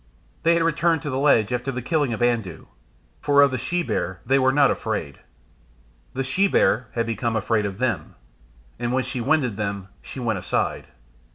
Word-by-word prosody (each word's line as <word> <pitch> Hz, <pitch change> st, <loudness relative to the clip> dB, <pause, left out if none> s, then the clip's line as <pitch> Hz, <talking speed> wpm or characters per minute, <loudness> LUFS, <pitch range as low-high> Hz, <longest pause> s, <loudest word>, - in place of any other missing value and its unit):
They 170 Hz, +1 st, +4 dB
had 170 Hz, -, +2 dB
returned 165 Hz, -1 st, +1 dB
to 145 Hz, -, -3 dB
the 130 Hz, -, -1 dB
ledge 125 Hz, -6 st, +3 dB
after 125 Hz, +2 st, -2 dB
the 125 Hz, -, -4 dB
killing 145 Hz, -2 st, 0 dB
of 115 Hz, +1 st, -2 dB
Andoo; 115 Hz, -9 st, -1 dB, 0.5 s
for 145 Hz, -1 st, +4 dB
of 140 Hz, -, +3 dB
the 130 Hz, -, -2 dB
she 175 Hz, +8 st, -1 dB
bear 95 Hz, -, -3 dB
they 135 Hz, +1 st, +3 dB
were 130 Hz, 0 st, +3 dB
not 140 Hz, -1 st, +4 dB
afraid. -, -, -4 dB, 1.0 s
The 135 Hz, -, -1 dB
she 160 Hz, +10 st, +2 dB
bear 125 Hz, -, +2 dB
had 115 Hz, -1 st, 0 dB
become 115 Hz, 0 st, -2 dB
afraid 110 Hz, -1 st, 0 dB
of 95 Hz, -1 st, -7 dB
them, 110 Hz, -10 st, -2 dB, 0.6 s
and 120 Hz, +1 st, -2 dB
when 130 Hz, 0 st, +1 dB
she 125 Hz, 0 st, -4 dB
winded 125 Hz, -5 st, +1 dB
them 100 Hz, -2 st, -4 dB
she -, -, -9 dB
went 115 Hz, -5 st, -1 dB
aside. -, -, -2 dB
125 Hz, 190 wpm, -23 LUFS, 110-140 Hz, 1.0 s, They